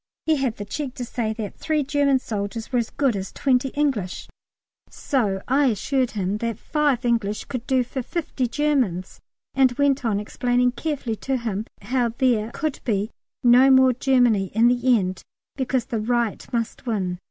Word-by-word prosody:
He 315 -1 +3
had 260 -5 -1
the 205 - -6
cheek 265 +4 -5
to 245 - -4
say 235 -2 -2
that 215 -3 -6
three 310 -2 0
German 280 -1 +2
soldiers 220 -1 -4
were 250 - +2
as 230 - -2
good 270 -6 +1
as 195 -1 -4
twenty 265 -1 +1
English, 265 -11 -1 0.6
so 205 -8 -1
I 275 +2 +3
assured 255 +3 0
him 195 +1 -1
that 230 -2 -2
five 290 -3 0
English 220 -3 0
could 250 -3 -5
do 260 -1 +3
for 260 +2 -5
fifty 275 -3 -2
Germans, 245 - -1 0.3
and 260 -2 +4
went 280 0 +1
on 215 -4 +1
explaining 245 +3 +1
carefully 255 -4 -3
to 265 +3 -1
him 220 -3 -3 0.2
how 245 +2 +1
there 235 -5 +2
could 310 -3 -3
be 210 -2 -1 0.3
no 250 +2 +7
more 260 -1 +6
Germany 245 -5 +3
in 230 +2 +5
the 245 0 +3
end 185 -3 -3 0.3
because 260 -3 -1
the 230 - -3
right 235 -1 -1
must 235 +1 -3
win! 185 -6 -1
245 Hz, 175 wpm, -23 LUFS, 220-265 Hz, 0.6 s, no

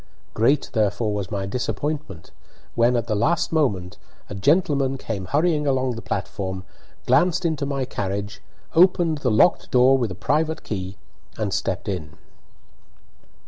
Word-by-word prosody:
Great, 135 +6 +2
therefore, 110 -1 +1
was 100 -3 -3
my 100 -1 -3
disappointment 125 - -4 0.4
when, 120 +1 +3
at 120 -1 0
the 110 - -1
last 145 +12 +1
moment, 100 - 0 0.3
a - - -3
gentleman 140 - +2
came 105 -7 -5
hurrying 150 - +1
along 130 -1 +1
the 115 -1 -6
platform, 95 -2 -4 0.4
glanced 180 0 +3
into 155 -4 0
my 135 -2 -1
carriage, 100 -2 -4 0.3
opened 170 -3 +4
the 130 - 0
locked 110 +11 +3
door 130 +1 +5
with 120 -3 0
a 90 - -6
private 155 - 0
key, 95 -2 -5 0.4
a 105 -3 -2
stepped 95 +2 -2
in. 80 -6 -5
120 Hz, 145 wpm, -23 LUFS, 100-145 Hz, 0.4 s, door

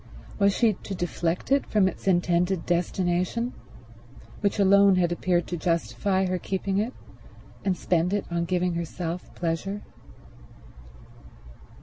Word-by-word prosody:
Was 200 0 +3
she 230 -3 +4
to 195 +1 -7
deflect 175 +3 -2
it 275 0 +4
from 205 -3 +3
its 190 - -6
intended 175 0 +2
destination, 180 +6 0 0.9
which 200 0 0
alone 200 0 +6
had 175 -2 +2
appeared 175 0 +1
to 175 - -4
justify 185 +3 0
her 185 0 -1
keeping 195 +1 -1
it, 230 +5 -2 0.7
and 185 -2 0
spend 175 +1 +1
it 205 -1 0
on 170 0 0
giving 180 0 0
herself 170 +1 -4
pleasure? 180 +4 -2
180 Hz, 125 wpm, -26 LUFS, 175-200 Hz, 0.9 s, alone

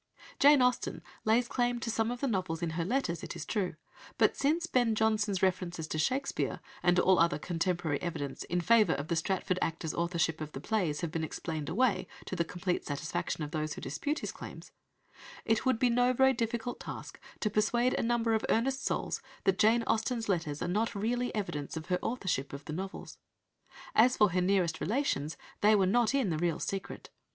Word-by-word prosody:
Jane 285 -2 +7
Austen 250 -1 0 0.2
lays 230 +3 +3
claim 245 -1 0
to 230 - -2
some 225 0 0
of 245 0 -4
the 275 - +1
novels 180 -7 -1
in 165 - -1
her 165 +1 -1
letters, 185 -4 -1
it - - -6
is 170 -2 -6
true, 190 -7 -1 0.4
but, - - +4
since 320 +5 +1
Ben 245 -8 +2
Jonson's 215 -3 +1
references 180 -3 0
to 155 - -2
Shakespeare, 260 - 0 0.2
and 175 0 +3
all 185 0 +5
other 170 +1 +3
contemporary 170 -3 -1
evidence 145 -6 -4
in 175 +1 -1
favour 215 -2 +5
of 140 +3 -4
the 170 - +1
Stratford 185 +2 0
actor's 160 -1 -2
authorship 170 -2 0
of 155 -1 -6
the - - -5
plays 175 -4 -1
have 170 -3 -2
been 165 0 -2
explained 155 -1 -4
away 240 +3 +1 0.2
to - - -4
the 170 - +1
complete 180 +2 -2
satisfaction 155 +2 -3
of 150 - -5
those 155 -1 -2
who - - -8
dispute 285 - -2
his - - -4
claims, - - -10 0.7
it 225 +3 +1
would 260 -3 +3
be 245 +1 +3
no 245 +1 +3
very 265 +1 +5
difficult 235 0 -2
task - - -8 0.2
to 210 - 0
persuade 235 +4 +2
a - - 0
number 230 -1 +1
of 220 - +1
earnest 265 +4 +1
souls - - -1 0.2
that 190 -1 +2
Jane 225 +2 +4
Austen's 230 +1 0
letters 165 -7 -1
are - - -2
not 215 +5 0
really 240 +4 0
evidence 160 -8 -3
of 160 +2 -7
her 180 0 +1
authorship 190 - -2
of 140 +1 -7
the 155 - -5
novels. 190 +4 -6 0.7
As 250 +3 +5
for 210 -3 +5
her 180 +1 +1
nearest 180 -3 +1
relations, 185 - -1 0.2
they 215 +1 +6
were 195 -2 +4
not 235 +6 +3
in 255 -10 +1
the 155 - -1
real 170 -2 +1
secret. 195 -1 -5
195 Hz, 200 wpm, -31 LUFS, 165-235 Hz, 0.7 s, Jane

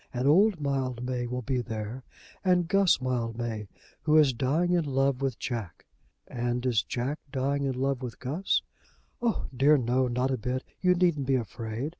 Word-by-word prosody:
And 125 +2 -1
old 190 +4 +5
Mildmay 130 -3 -2
will 125 +1 -4
be 130 0 0
there, 115 +2 -5 0.4
and 180 -3 +3
Guss 195 -3 +4
Mildmay, 115 -3 -2 0.3
who 155 0 +4
is 145 -4 +5
dying 145 +9 +1
in 175 -2 +3
love 135 -2 +1
with 135 -4 -1
Jack." 110 -9 -5 0.4
"And 120 +1 -2
is 120 -5 +3
Jack 125 +7 -3
dying 140 +2 0
in 130 -2 -2
love 135 -1 0
with 125 -3 -6
Guss?" 155 +10 0 0.6
"Oh! 235 -2 0
dear 145 +4 +5
no; 125 +1 +1
not 125 +2 0
a 130 - 0
bit. 125 +4 -2 0.2
You 180 -1 +4
needn't 170 -7 +2
be 135 - +3
afraid. 115 +2 -3
130 Hz, 170 wpm, -28 LUFS, 120-145 Hz, 0.6 s, old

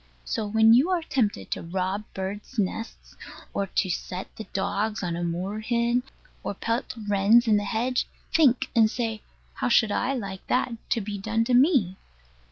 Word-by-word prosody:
So 220 -2 -2
when 220 +1 +5
you 265 +9 +5
are 360 -3 +1
tempted 240 -9 -1
to - - -2
rob 190 +4 -2
birds' 200 +6 -5
nests, 220 +3 -3 0.4
or 200 - -1
to 190 0 0
set 180 +1 -5
the 220 - -7
dogs 205 +2 -2
on 175 -2 -2
a 175 - -3
moorhen, 215 +8 0 0.4
or - - -4
pelt 230 +6 -2
wrens 205 +4 +4
in 215 -2 +5
the 205 - -1
hedge, 240 +4 0 0.3
think; 260 -5 +4
and 220 -2 +5
say 225 -2 -3 0.3
How - - -1
should 220 -3 +4
I 265 +5 0
like 195 -6 -6
that 250 0 +1 0.2
to 230 - +1
be 205 0 -5
done 220 +3 0
to 245 - -1
me? 245 - +4
220 Hz, 175 wpm, -26 LUFS, 195-240 Hz, 0.4 s, when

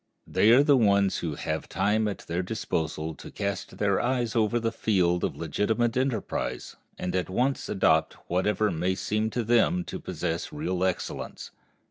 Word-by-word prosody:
They 105 - +3
are 125 +5 +7
the 145 -1 +5
ones 100 -4 +3
who 80 -4 -3
have - - -3
time 105 +3 +1
at 100 - -5
their 85 +2 -1
disposal 80 -5 -3
to - - -11
cast 100 -1 -4
their 100 -2 +2
eyes 120 -2 0
over 115 +1 +2
the 115 0 -1
field 90 -6 +1
of - - -1
legitimate 115 +3 0
enterprise, 130 -4 -2 0.2
and 90 0 -3
at 90 0 -1
once 125 +8 0
adopt 80 -5 +3
whatever 105 +4 +1
may 90 +3 0
seem 110 +3 -1
to 120 +2 -2
them 120 +11 +3
to - - -6
possess 85 - -3
real 95 - -2
excellence. 95 -1 -3
105 Hz, 165 wpm, -27 LUFS, 90-115 Hz, 0.2 s, are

